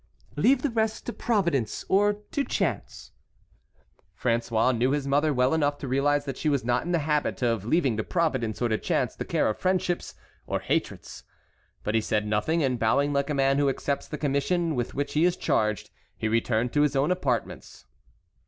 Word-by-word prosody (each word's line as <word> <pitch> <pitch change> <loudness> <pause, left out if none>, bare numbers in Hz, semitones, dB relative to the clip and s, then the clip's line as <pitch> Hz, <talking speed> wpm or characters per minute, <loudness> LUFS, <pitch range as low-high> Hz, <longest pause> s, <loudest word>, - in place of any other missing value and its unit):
"Leave 260 0 +3
the 290 - 0
rest 220 -1 -1
to 240 - -4
Providence 170 - -1
or 205 +2 +3 0.2
to 285 - 0
chance." 160 - -3 1.1
François 115 0 +1
knew 120 +3 +1
his 145 -2 -1
mother 145 +3 +2
well 125 +1 +2
enough 145 -2 +1
to 140 - -6
realize 145 +2 +1
that 135 -3 -5
she 155 - 0
was 140 -5 0
not 120 0 +1
in 175 - -3
the 175 - +3
habit 150 -4 0
of 115 -4 0
leaving 135 -3 +1
to 110 - -1
Providence 130 - -1
or 120 - +1
to 110 - 0
chance - - -1
the - - -4
care - - +1
of 110 - -2
friendships 185 -1 -1 0.3
or - - -1
hatreds. - - -3 0.6
But 105 - -2
he 115 - +3
said 105 0 -1
nothing, 110 +11 0
and 130 -3 0
bowing 140 +6 +2
like 140 +1 0
a 150 - 0
man 135 0 +2
who 140 -1 +3
accepts 140 +1 -2
the 150 - -5
commission 155 +4 0
with 120 -3 -3
which 145 +1 -2
he 155 - +2
is 180 +1 +2
charged, 105 -2 0 0.3
he 110 - -2
returned 115 +1 0
to 145 - +3
his 145 -2 +2
own 140 +5 +2
apartments. 125 - -3
140 Hz, 195 wpm, -26 LUFS, 120-160 Hz, 1.1 s, Leave